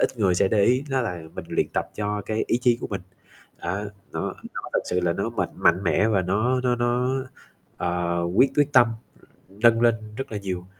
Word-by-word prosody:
ít 125 - 0
người 95 -4 +3
sẽ 95 - +3
để 105 -2 +3
ý, 130 +3 +3
đó 135 - +2
là 90 -7 -4
mình - - -6
luyện - - +1
tập - - -1
cho 105 -1 -2
cái 110 +2 -1
ý 120 - +1
chí 120 -2 +4
của - - -3
mình, 100 -2 -3 0.6
đó, 95 +4 -2 0.3
nó - - -3 0.3
nó - - -4
thật - - +2
sự 90 - 0
là 85 -1 +1
nó 100 +6 -2
mạnh - - -2
mạnh 90 +3 +3
mẽ 105 +5 +3
và 100 -4 +2
nó 110 +8 +1
nó 125 -1 +1
nó, 120 +1 +1 0.7
ờ, 85 0 -1 0.2
quyết 135 - +6
quyết 145 0 +3
tâm 120 -3 +7 0.6
nâng 115 +4 +3
lên 120 -1 +5 0.2
rất 135 -4 -5
là 105 - -2
nhiều. 90 -2 -5
105 Hz, 215 wpm, -24 LUFS, 95-120 Hz, 0.7 s, tâm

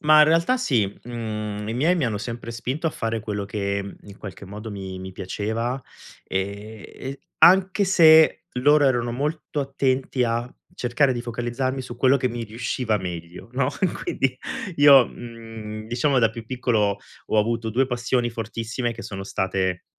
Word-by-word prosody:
Ma 155 0 +6
in - - +9
realtà 165 +11 +3
sì. 130 - +2 0.2
Mhmm, 110 -3 -4
i 110 - -2
miei 155 +9 +3
mi 160 - +1
hanno 110 -4 -1
sempre 115 +2 -6
spinto 130 +7 -3
a 160 - +2
fare 115 -4 -2
quello 105 -1 -3
che 100 -1 -3
in 100 -1 -13
qualche 100 -2 -9
modo 105 +3 -7
mi 95 -2 -6
mi 95 0 -7
piaceva, 110 +7 -3 0.4
e 100 +3 -5
e 135 +1 -7 0.2
anche 190 +2 +6
se 160 -4 +6
loro 145 +4 +4
erano 120 -2 +1
molto 150 +2 -2
attenti 135 -2 0
a 120 +1 -2 0.2
cercare 130 +2 +2
di 120 - -3
focalizzarmi 120 +2 -2
su 125 -1 -8
quello 130 +2 +4
che 130 -1 0
mi 120 0 -4
riusciva 115 +1 -1
meglio, 90 -2 -7
no. 125 0 +1
E 190 - +4
quindi 135 -5 -2 0.4
io, 140 -4 +8
mhmm, 115 -2 -8
diciamo 125 +4 +1
da 115 -2 +4
più 115 0 -8
piccolo, 110 -5 +1 0.3
ho 110 - +1
avuto 115 +1 0
2 130 +4 +2
passioni 125 -1 0
fortissime 115 +2 -3
che 115 0 -9
sono 95 -1 -6
state, 95 -2 -1
120 Hz, 170 wpm, -24 LUFS, 105-130 Hz, 0.4 s, in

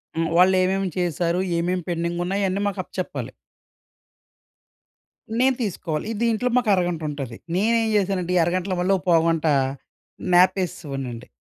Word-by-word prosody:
హ్మ్. 165 0 0
వాళ్ళేవేమి 185 +1 +3
చేశారు, 175 0 0 0.2
ఏమేమి 180 +1 -1
పెండింగున్నాయన్నీ 175 +3 -1
మాకప్ప 190 -2 -4
చెప్పాలి. 185 - -4 2.1
నేను 260 0 +3
తీసుకోవాలి. 165 -5 -3
ఇ - - -2
దీంట్లో 235 +2 +1
మాకు 245 -3 +1
అరగంటుంటది. 155 -8 -3 0.2
నేనేం 225 +3 +2
చేశానంటే 185 -3 0
ఈ - - +5
అరగంటలో 185 +2 -1
మళ్ళో 195 +2 +3
పావుగంట 165 -1 +3 0.9
న్యాపేసేసేవాడినండి. 150 -9 +1
180 Hz, 105 wpm, -23 LUFS, 170-195 Hz, 2.1 s, ఈ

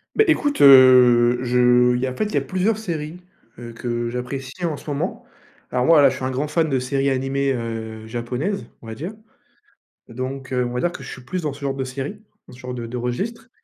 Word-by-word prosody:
Ben 435 - +4
écoute, 290 0 +1
heu, 125 -3 +7
je 125 0 +4
il 125 - -1
y 130 - +1
a 130 - -3
en - - -11
fait - - 0
il 210 - -7
y - - +1
a - - +2
plusieurs 190 +3 0
séries, 170 -6 -5 0.4
heu, 120 -1 -8
que 120 0 -3
j'apprécie 130 +6 -6
en 155 -3 -2
ce 150 - -9
moment. 140 - -3 0.5
Alors, 125 0 0
moi 160 -3 +6
là, 140 - +6
je - - -5
suis - - -5
un 130 - -1
grand 140 +4 -2
fan 160 +1 +1
de 135 -3 +1
séries 135 +2 -1
animées, 135 +1 0
heu, 110 -2 -5
japonaises, 125 - -3 0.2
on - - -12
va 110 - -5
dire. 170 - -6 0.9
Donc, 130 +3 -6
heu, 125 -1 +1
on 120 - -4
va 125 - -2
dire 175 - +1
que 140 - -9
je - - -8
suis 130 - -10
plus 180 +7 -4
dans 150 - -2
ce 140 - -12
genre 140 -1 -2
de 135 -1 -3
série, 135 +10 -6 0.3
dans - - -13
ce 125 - -15
genre 125 -1 -7
de 120 -2 -5
de 125 - -6
registre. 200 - -4
130 Hz, 245 wpm, -21 LUFS, 125-150 Hz, 0.9 s, heu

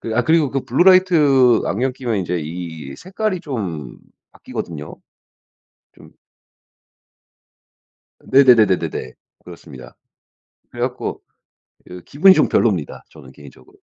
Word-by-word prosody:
그 110 - -5
아 - - +3
그리고 160 0 +1
그 135 -1 -3
블루라이트 150 -6 +4
안경 125 +6 -1
끼면 120 -4 -3
인제 90 -1 -3
이 80 -4 -8
색깔이 195 0 -4
좀 95 - -6 0.3
바뀌거든요. 75 -3 -8 1.0
좀 - - -18 2.1
네네네네네네. 105 - +2 0.3
그렇습니다. - - -13 0.8
그래 - - -7
갖고 - - -4 0.7
이 90 0 -11
기분이 185 - +5
좀 155 - +2
별로입니다 95 -10 -1
저는 70 -5 -16
개인적으로. 70 +1 -18
115 Hz, 260 characters per minute, -18 LUFS, -, 2.1 s, 기분이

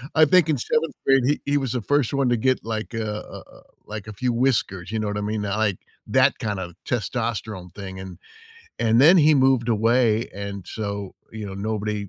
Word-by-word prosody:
I 160 0 +7
think 165 +1 +4
in 150 - +2
7th 155 +6 -1
grade, 135 0 +5
he 145 +3 +1
he - - +4
was 135 -4 -2
the 125 - -1
first 145 +3 +1
one 140 -1 +1
to 120 - +2
get, 130 +2 0
like, 110 0 -4
a, 115 -1 -2 0.2
uh - - -10
uh - - -18 0.2
like, 105 -1 -7
a 110 - -7
few 125 +4 -1
whiskers, 110 -7 0
you 110 - -1
know 110 - -2
what 105 0 -2
I - - -2
mean? 105 +1 -2
Not 100 +1 -2
like 105 -4 +1 0.3
that - - +3
kind 105 -3 -2
of 90 -2 -6
testosterone 110 -6 -3
thing, 95 -2 -7
and 95 -2 -9 0.6
and 115 +1 +3
then 165 +7 +8
he 155 -1 +6
moved 130 -3 +3
away, 115 0 +2
and 100 -1 -6
so, 100 -2 -5 0.2
you 110 -1 -6
know, 95 - -7
nobody 105 0 -3
110 Hz, 220 wpm, -23 LUFS, 100-130 Hz, 0.6 s, then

